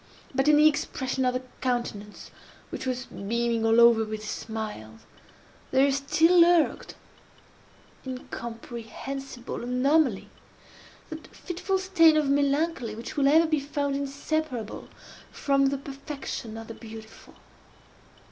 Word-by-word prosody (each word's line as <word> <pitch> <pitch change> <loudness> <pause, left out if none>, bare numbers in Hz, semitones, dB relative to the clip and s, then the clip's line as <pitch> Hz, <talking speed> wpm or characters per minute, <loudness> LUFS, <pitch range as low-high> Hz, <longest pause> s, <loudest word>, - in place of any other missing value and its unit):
But 270 +2 +1
in 300 -1 +6
the 305 +1 +7
expression 265 -3 -1
of 250 0 +1
the 255 - -2 0.2
countenance, 235 -5 -3 0.4
which 260 - -5
was 255 0 -2
beaming 230 +3 -2
all 225 +1 +4
over 235 -1 +6
with 215 0 -6
smiles, 210 - -6 0.7
there 275 +1 +4
still 320 +6 +4
lurked 340 -2 +3 1.1
(incomprehensible 245 +1 -7
anomaly!) 255 -1 +1 0.8
that 315 0 -8
fitful 375 +2 -3
stain 355 -4 +4
of 290 -2 +2
melancholy 280 -4 0
which 230 +2 -7
will 280 -2 +3
ever 320 +4 +6
be 310 -2 +1
found 285 0 -2
inseparable 280 -3 -3 0.4
from 275 -1 +2
the 275 +1 0
perfection 275 -4 -7
of 225 - -7
the 225 - -8
beautiful. 220 -1 -12
270 Hz, 120 wpm, -27 LUFS, 230-295 Hz, 1.1 s, the